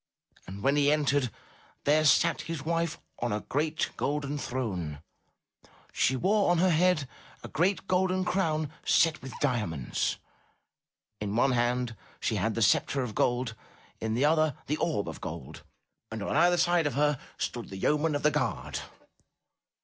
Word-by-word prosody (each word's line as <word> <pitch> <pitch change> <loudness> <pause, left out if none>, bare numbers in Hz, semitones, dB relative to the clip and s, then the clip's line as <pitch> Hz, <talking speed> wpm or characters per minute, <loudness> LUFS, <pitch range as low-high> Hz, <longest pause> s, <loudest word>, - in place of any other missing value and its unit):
And 100 +2 -8
when 140 +2 +3
he 145 0 +4
entered, 145 -3 +2 0.5
there 155 +2 +3
sat 165 +3 +4
his 160 -3 -5
wife 170 +1 -1 0.2
on 120 -1 -1
a 105 0 -1
great 155 +3 -1
golden 145 0 -1
throne; 95 - -3 0.9
she 130 - +2
wore 200 - +2
on 175 - +4
her 180 +2 +4
head 165 -3 +3 0.4
a - - -6
great 180 +2 0
golden 185 0 +1
crown 155 -6 0
set 160 -2 +3
with 130 0 -9
diamonds; 105 - -1 1.0
in 105 0 -3
one 130 +3 +3
hand 120 -1 0 0.2
she - - -1
had - - 0
the - - +2
sceptre 135 -2 +2
of 115 -4 -5
gold, 120 +1 0 0.5
in 110 0 -2
the 130 +5 +2
other 155 -2 +2
the 150 - -1
orb 155 -12 -1
of - - -7
gold, - - -7 0.5
and 110 -2 -5
on - - -2
either 175 0 +5
side 175 -2 +3
of 145 - -3
her 145 -1 +2 0.2
stood - - -4
the 95 - -7
yeomen 150 +8 +1
of 145 - -2
the 150 - +4
guard. 130 -6 -2
145 Hz, 160 wpm, -29 LUFS, 125-165 Hz, 1.0 s, either